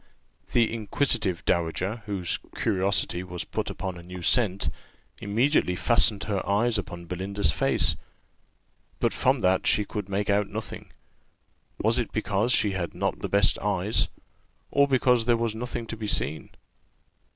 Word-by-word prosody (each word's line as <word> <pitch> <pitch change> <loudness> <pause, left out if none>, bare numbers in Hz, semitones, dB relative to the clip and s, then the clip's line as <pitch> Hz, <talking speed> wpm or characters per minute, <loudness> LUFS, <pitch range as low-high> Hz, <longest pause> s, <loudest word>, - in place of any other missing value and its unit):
The 115 -1 +3
inquisitive 105 -5 -1
dowager, 90 +5 0
whose 95 -4 -2 0.2
curiosity 95 -3 0
was 90 -1 -5
put - - -3
upon 95 -1 -5
a - - -9
new 90 +1 -9
scent, 100 -2 +2 0.5
immediately 110 -2 +2
fastened 100 +2 +3
her 100 -3 -2
eyes 110 +2 +2
upon 85 -2 -7
Belinda's 95 +4 -1
face; - - +3 1.0
but - - +1
from - - +2
that 95 0 +2
she 105 - +3
could 105 -1 -5
make 100 +1 -1
out 100 0 +2
nothing. - - -7 0.9
Was 115 +4 +2
it 120 - -2
because 110 +1 0
she 105 -4 +3
had 95 -3 -4
not - - -1
the - - -4
best - - +3
eyes, - - 0 0.6
or 140 0 +4
because 125 -3 +3
there 120 -1 +3
was 115 -1 -1
nothing 120 +1 -4
to 115 - -6
be 110 -1 -5
seen? 80 -6 -1
100 Hz, 150 wpm, -26 LUFS, 95-115 Hz, 1.0 s, or